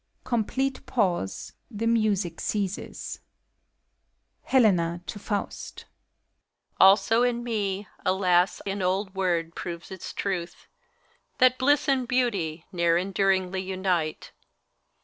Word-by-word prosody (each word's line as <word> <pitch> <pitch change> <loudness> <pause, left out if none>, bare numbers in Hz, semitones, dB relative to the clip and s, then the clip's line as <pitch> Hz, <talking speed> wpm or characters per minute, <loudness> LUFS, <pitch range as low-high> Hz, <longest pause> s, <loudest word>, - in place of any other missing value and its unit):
Complete 255 +3 -1
pause. 180 - -1 0.2
The 225 -1 -4
music 210 -7 +1
ceases, 200 -2 -3 1.3
hele; 245 -6 +5
na 170 -1 -1
(to 205 - -6
Faust). 205 0 -4 0.9
Also 195 +4 +6
in 240 -1 +1
me, 205 -4 -2 0.2
alas 185 -1 +2
I 195 - -1
an 195 0 -3
old 190 +1 0
word 175 -4 0
proves 170 +1 -7
its 190 -2 -7
truth, 185 -3 -4 0.7
That 255 0 +4
Bliss 290 +3 +3
and 265 -3 +2
Beauty 200 -11 0
ne'er 170 -2 +2
enduringly 190 0 +1
unite. 185 -4 -2
195 Hz, 110 wpm, -26 LUFS, 180-230 Hz, 1.3 s, Also